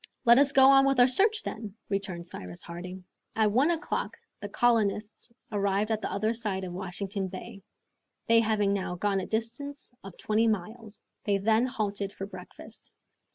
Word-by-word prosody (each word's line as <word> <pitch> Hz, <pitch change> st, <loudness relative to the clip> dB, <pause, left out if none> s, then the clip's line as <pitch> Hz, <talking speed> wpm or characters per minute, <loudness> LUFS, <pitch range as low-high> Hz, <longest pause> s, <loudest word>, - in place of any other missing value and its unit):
"Let 235 Hz, +2 st, +7 dB
us 280 Hz, -1 st, +4 dB
go 265 Hz, -1 st, +6 dB
on 270 Hz, 0 st, +6 dB
with 270 Hz, -2 st, +2 dB
our 245 Hz, -, +8 dB
search, 415 Hz, -, +3 dB
then," 215 Hz, -3 st, -6 dB
returned 190 Hz, -3 st, -3 dB
Cyrus 90 Hz, -, -7 dB
Harding. 180 Hz, +2 st, -8 dB, 0.3 s
At 215 Hz, -1 st, +3 dB
one 260 Hz, +9 st, +3 dB
o'clock 340 Hz, 0 st, -2 dB, 0.2 s
the -, -, -6 dB
colonists 220 Hz, -1 st, +1 dB, 0.2 s
arrived 200 Hz, +1 st, 0 dB
at 220 Hz, -1 st, 0 dB
the -, -, -3 dB
other 215 Hz, +3 st, 0 dB
side 210 Hz, -5 st, -2 dB
of 180 Hz, -1 st, -5 dB
Washington 190 Hz, +2 st, -4 dB
Bay, 190 Hz, +1 st, -9 dB, 0.6 s
they 230 Hz, 0 st, +5 dB
having 215 Hz, -3 st, +1 dB
now 185 Hz, -2 st, -2 dB
gone 195 Hz, +2 st, 0 dB
a 185 Hz, -, -5 dB
distance 245 Hz, +5 st, -4 dB
of 195 Hz, -2 st, -11 dB
twenty 220 Hz, +2 st, +1 dB
miles. 215 Hz, +2 st, -4 dB, 0.2 s
They 200 Hz, -1 st, +2 dB
then 220 Hz, +5 st, +2 dB
halted 205 Hz, -5 st, -3 dB
for 195 Hz, -, -6 dB
breakfast. 205 Hz, -, -12 dB
210 Hz, 170 wpm, -28 LUFS, 195-235 Hz, 0.6 s, our